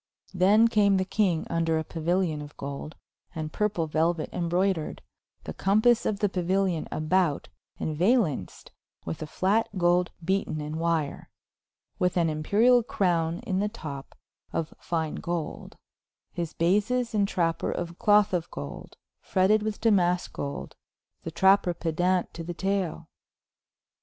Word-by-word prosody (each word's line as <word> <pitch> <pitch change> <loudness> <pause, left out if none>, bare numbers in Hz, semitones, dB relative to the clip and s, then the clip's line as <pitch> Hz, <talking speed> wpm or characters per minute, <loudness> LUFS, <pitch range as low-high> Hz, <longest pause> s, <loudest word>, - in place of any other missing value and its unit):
Then 200 +5 +5
came 205 -3 +3
the 185 - 0
kynge 185 -5 +1
vnder 165 -1 0
a - - -2
Pauilion 165 -1 -1
of 145 0 -11
golde, 140 +2 -6 0.4
and 155 -1 -4
purpul 200 -6 0
Veluet 160 +1 0
embroudered, 175 -1 -1 0.4
the - - -6
compass 215 +5 +3
of 200 - -2
the 205 - +4
Pauilion 185 -2 0
about, 155 -1 0 0.3
and 155 - -2
valenced 175 - 0 0.3
with 80 - -5
a 155 - -4
flat, 205 +8 +1
gold 175 0 +3 0.2
beaten 190 -4 0
in 150 +1 -4
wyre, 165 -3 -1 0.7
with 180 0 +1
an 170 -2 +3
Imperiall 215 +11 +3
croune 170 -6 0
in 190 -6 -1
the 210 +1 0
top, 145 -11 -8 0.4
of 165 -1 -3
fyne 160 -3 -2
Golde, 170 -2 -4 0.6
his 170 -2 -4
bases 210 +8 +1
and 205 -2 +2
trapper 165 -4 0
of 170 0 -5
cloth 210 -2 +4
of 170 -2 -1
Golde, 70 0 -8 0.2
fretted 195 +3 +2
with 215 0 -3
Damask 180 -5 +2
Golde, 140 0 -5 0.5
the - - -5
trapper 190 +1 +3
pedant 175 +3 0
to 170 - -6
the 175 +1 -6
tail. 190 -4 -2
175 Hz, 140 wpm, -27 LUFS, 160-200 Hz, 0.7 s, Then